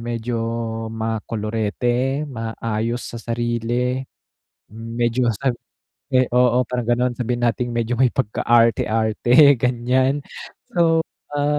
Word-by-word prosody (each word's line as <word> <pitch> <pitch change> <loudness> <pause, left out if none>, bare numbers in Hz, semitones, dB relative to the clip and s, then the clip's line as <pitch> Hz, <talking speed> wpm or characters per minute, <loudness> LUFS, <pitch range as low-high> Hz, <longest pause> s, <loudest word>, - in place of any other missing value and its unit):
medyo 120 0 -3 0.6
ma-kolorete, 115 +4 -1
maayos 115 -1 -3
sa - - -5
sarili, 120 +2 -1 0.7
medyo 115 +2 -1
sab 130 +3 -1 0.8
oo 125 0 +4
parang 125 -2 -2
ganon 125 +1 +2
sabihin 120 0 -2
nating 120 +1 -1
medyo 115 +1 -1
may 130 - +5
pagka-arte-arte 120 +3 +3
ganyan 130 +3 +1 0.5
so, 165 -2 +3 0.3
ah, 145 0 +1
120 Hz, 95 wpm, -21 LUFS, 115-125 Hz, 0.8 s, may